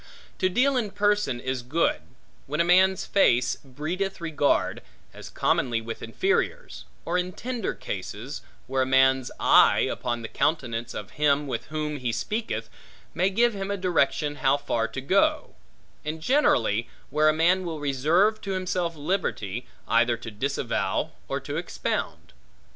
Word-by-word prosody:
To 185 - +2
deal 255 +7 +2
in 225 -4 0
person 205 -10 +1
is 130 0 -3
good, 145 +8 0 0.5
when 150 +3 -3
a - - +5
man's 185 +2 +4
face 125 -11 +3
breedeth 170 +9 -4
regard, 150 -4 0 0.3
as - - -10
commonly 120 -3 +1
with 115 0 -7
inferiors; 430 +6 -1 0.2
or 175 +2 +1
in 180 +1 -3
tender 245 0 -3
cases, - - -6 0.2
where 130 +1 0
a - - +2
man's 130 -1 +4
eye, - - +6
upon 120 -1 -2
the - - -4
countenance 120 -5 -1
of 100 -3 -6
him 145 0 +3
with 125 -5 -4
whom 150 -1 -3
he 125 -3 -2
speaketh, 215 - -3 0.5
may 185 +3 +2
give 235 +4 +2
him 195 -1 -4
a 200 - -1
direction 150 -5 +1
how 135 +1 +3
far 115 -5 -1
to 135 - -6
go; 250 - +2 0.5
and 155 +1 -4
generally, 120 - +2 0.2
where 155 +2 +4
a - - +6
man 175 +4 +3
will 165 -3 -4
reserve 155 +10 +2
to 195 - -3
himself 180 -2 -1
liberty, 145 - -2 0.2
either 120 +1 +3
to 115 -1 -8
disavow 130 +2 -1 0.2
or - - -2
to - - -5
expound. - - -3
155 Hz, 155 wpm, -26 LUFS, 130-190 Hz, 0.5 s, eye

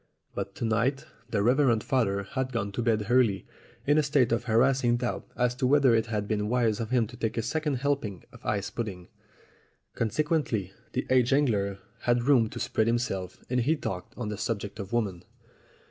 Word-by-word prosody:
But - - -5
to - - -3
night 115 +5 +1 0.2
the 100 -3 0
Reverend 125 -2 +3
Father 100 -7 +1
had 130 +5 -3
gone 100 -5 -2
to 110 - -3
bed 110 -3 +1
early 115 -6 +3 0.4
in 145 +2 +4
a - - +5
state 140 -5 +2
of 115 +1 0
harassing 120 +1 +3
doubt 120 0 -3
as 125 0 +2
to 125 +1 0
whether 140 -2 +5
it 115 0 +2
had 105 -2 -2
been 105 -1 -1
wise 115 -3 +1
of 115 -2 -3
him 125 -2 +2
to 120 - -11
take 115 -1 -3
a 115 - 0
second 150 +3 -1
helping 130 -8 -2
of - - -15
ice 100 -2 -1
pud 120 -2 -3
ding. 90 -3 -8 0.8
Consequently, 115 - 0 0.2
the 130 - -1
aged 130 0 +4
angler 105 -9 +1 0.2
had 120 0 +1
room 125 -4 +4
to - - -7
spread 110 - 0
himself, 105 -6 -2
and 125 0 0
he 150 +7 +2
talked 95 - -5
on 110 -4 -3
the 105 -1 -5
subject 105 -1 -3
of 100 -1 -6
women. 100 -7 -1
120 Hz, 195 wpm, -28 LUFS, 105-130 Hz, 0.8 s, a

